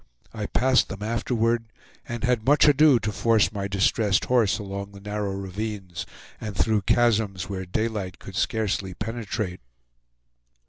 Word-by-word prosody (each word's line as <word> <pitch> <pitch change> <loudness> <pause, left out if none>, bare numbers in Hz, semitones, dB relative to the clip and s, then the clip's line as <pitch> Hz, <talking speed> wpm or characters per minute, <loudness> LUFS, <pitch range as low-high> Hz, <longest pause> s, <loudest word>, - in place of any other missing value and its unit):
I 110 -2 -4
passed 130 +1 +3
them 100 +1 -6
afterward, 115 +1 0 0.4
and 120 0 -5
had 125 -3 +1
much 145 +4 +5
ado 145 -2 +6
to 105 -2 -2
force 110 -3 +2
my 100 -2 -3
distressed 100 +1 +2
horse 120 -6 +3
along 100 -1 -6
the 100 - -11
narrow 105 0 -3
ravines, 100 -1 -5 0.3
and 105 -2 -5
through 110 -2 +2
chasms 110 -5 +2
where 95 -2 -4
daylight 100 -1 -2
could 95 - -10
scarcely 100 -3 -1
penetrate. 105 -4 -4
105 Hz, 140 wpm, -25 LUFS, 100-115 Hz, 0.4 s, ado